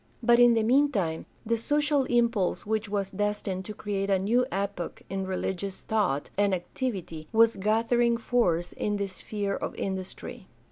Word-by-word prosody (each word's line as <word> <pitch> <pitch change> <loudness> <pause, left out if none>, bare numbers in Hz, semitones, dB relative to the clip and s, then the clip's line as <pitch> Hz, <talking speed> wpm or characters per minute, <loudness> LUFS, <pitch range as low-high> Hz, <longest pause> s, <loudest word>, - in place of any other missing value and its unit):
But 235 +1 +5
in 240 -1 +7
the 225 - +2
meantime 225 - +2 0.2
the 230 +1 +1
social 290 +3 +1
impulse 235 -6 +1
which 215 0 -1
was 200 -1 -2
destined 205 -2 -2
to 210 - -7
create 200 -1 -2
a 195 - +4
new 235 +7 +2
epoch 195 -3 -3
'n 195 -1 -2
religious 190 +1 -3
thought 190 -11 0
and 200 -2 +3
activity 175 -4 -5
was 230 0 +5
gathering 230 +4 +2
force 180 -8 +1
in 205 -1 -1
the 200 - -1
sphere 200 +1 -4
of - - -4
industry. 190 -1 -5
205 Hz, 155 wpm, -28 LUFS, 190-230 Hz, 0.2 s, in